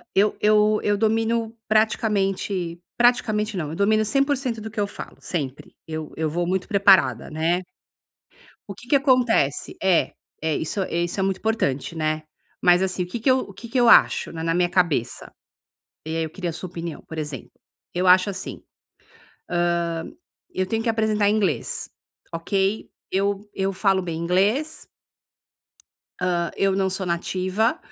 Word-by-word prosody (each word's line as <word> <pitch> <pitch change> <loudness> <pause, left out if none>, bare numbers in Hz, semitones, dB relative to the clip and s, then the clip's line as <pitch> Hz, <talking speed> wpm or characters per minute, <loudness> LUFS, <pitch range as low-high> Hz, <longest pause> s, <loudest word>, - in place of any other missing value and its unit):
Eu 205 +2 +3
eu 210 0 +4
eu 205 0 +2
domino 225 +1 0
praticamente 195 -5 0 0.2
praticamente 220 -3 +2
não, 155 -4 -3
eu 160 - -5
domino 215 +3 +3
100% 275 -1 0
do 220 +1 -7
que 220 - -11
eu 205 - +1
falo, - - -9
sempre. 140 -6 -5
Eu 155 -1 -6
eu 160 0 0
vou 175 +3 -1
muito 185 +1 -1
preparada, 200 -2 +4
né. 165 +3 0 1.1
O 200 - -6
que 240 +5 -15
que 280 - +5
acontece? 250 - +2
É 190 -3 +3 0.3
é, 160 -1 0
isso 175 +5 -2
isso 175 +2 -2
é - - +1
muito 190 -1 0
importante, 170 -9 -1
né. 155 -1 -1 0.4
Mas 175 +1 +5
assim, 185 -1 -1
o - - -9
que 205 +7 -5
que 260 - +2
eu 255 -6 +1
que 235 - -10
que 255 +3 -1
eu 240 - +5
acho - - +5
na 165 -1 -5
na 165 - +1
minha 175 0 +2
cabeça? 170 -11 0 0.8
E 160 - -3
aí 165 - 0
eu 160 - -6
queria 175 +1 -4
sua 180 +3 -7
opinião. 170 -2 -6
Por 160 - -7
exemplo, 150 -5 -5 0.4
eu 180 +1 0
acho 185 +2 +6
assim, 190 -1 -6 1.2
hã, 165 -1 -2 0.5
eu 185 - 0
tenho 225 +3 -1
que 235 - -2
apresentar 215 -2 +2
inglês, 195 - 0 0.4
ok? 195 +5 -1 0.2
Eu 200 +1 0
eu 195 0 -1
falo 195 0 +2
bem 170 -2 -4
inglês 200 - 0 1.3
hã, 175 -2 0
eu 195 -1 +2
não 190 -1 +1
sou 190 0 -3
nativa, 185 +6 0
190 Hz, 160 wpm, -23 LUFS, 170-215 Hz, 1.3 s, acho